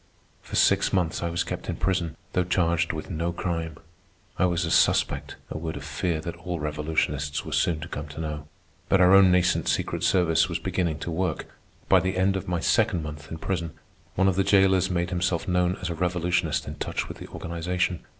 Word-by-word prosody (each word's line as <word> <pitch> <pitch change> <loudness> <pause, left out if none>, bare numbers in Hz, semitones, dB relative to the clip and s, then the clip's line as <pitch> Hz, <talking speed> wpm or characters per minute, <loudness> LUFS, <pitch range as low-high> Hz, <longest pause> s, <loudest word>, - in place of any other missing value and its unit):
For - - -8
six - - +4
months 90 -4 0
I 85 - -1
was 85 0 -1
kept - - -6
in - - -1
prison, 90 -5 -1 0.2
though 90 - +2
charged 85 -2 +1
with 80 +2 -6
no 85 +1 -1
crime. 85 -3 -3 0.6
I - - +4
was 85 -1 0
a 85 - -3
suspect—a - - +1
word 80 -2 -4
of 70 - -7
fear 80 +2 -2
that 85 +1 -5
all 85 0 -4
revolutionists 75 -1 -1
were - - -6
soon 80 -3 +1
to 80 - -6
come 75 -2 -6
to 75 +1 -9
know. 75 -2 -4 0.4
But 95 - +4
our 90 +1 +6
own 95 -1 +7
nascent 90 0 +2
secret 85 0 -1
service 85 -1 +3
was 85 - -1
beginning 90 -4 -1
to 85 - -3
work. 90 +3 -1 0.4
By 95 - +6
the 95 +1 -2
end 95 +1 +2
of 95 - -4
my 90 -1 0
second 80 0 +2
month 75 0 -8
in 80 - -5
prison, 85 -2 -3 0.4
one 95 +1 +3
of 95 -1 +1
the 95 - +4
jailers 95 -1 +4
made 85 0 -1
himself 90 -1 0
known 90 0 +2
as 90 - -3
a - - -1
revolutionist 90 +1 0
in - - -6
touch - - -3
with - - -9
the - - -8
organization. 85 +1 -2
85 Hz, 210 wpm, -26 LUFS, 80-90 Hz, 0.6 s, own